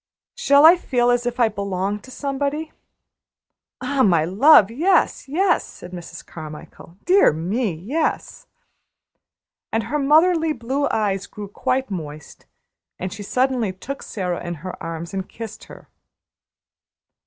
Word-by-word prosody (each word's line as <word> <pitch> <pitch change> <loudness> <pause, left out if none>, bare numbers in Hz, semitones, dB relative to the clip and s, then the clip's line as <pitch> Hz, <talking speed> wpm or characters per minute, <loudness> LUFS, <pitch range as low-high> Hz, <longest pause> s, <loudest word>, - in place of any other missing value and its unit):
Shall 290 -11 +4
I 340 +3 +9
feel 245 -7 +1
as 245 0 0
if 245 +1 -3
I 235 - +5
belonged 200 -1 -3
to - - -14
somebody?" 285 +3 -3 1.1
"Ah, 265 +1 0
my 170 -9 +4
love, 215 - +6
yes! 335 +4 +1
yes!" 355 +6 +2
said 180 - -12
Mrs. 170 -2 -9
Carmichael; 155 +2 -11
"dear 380 +3 +5
me, 190 +9 -1
yes!" 295 - -3 1.2
And 225 0 0
her 300 +6 -2
motherly 320 +3 +3
blue 270 +3 -2
eyes 200 -3 -1
grew 210 -1 -8
quite 255 +5 -2
moist, 155 -5 -8 0.5
and 185 +1 -5
she 205 - -8
suddenly 250 0 0
took 275 +9 -7
Sara 180 -4 -4
in 175 0 -4
her 185 - -5
arms 165 +2 -6
and 190 -1 -4
kissed 225 -1 -9
her. - - -14
230 Hz, 135 wpm, -21 LUFS, 185-280 Hz, 1.2 s, I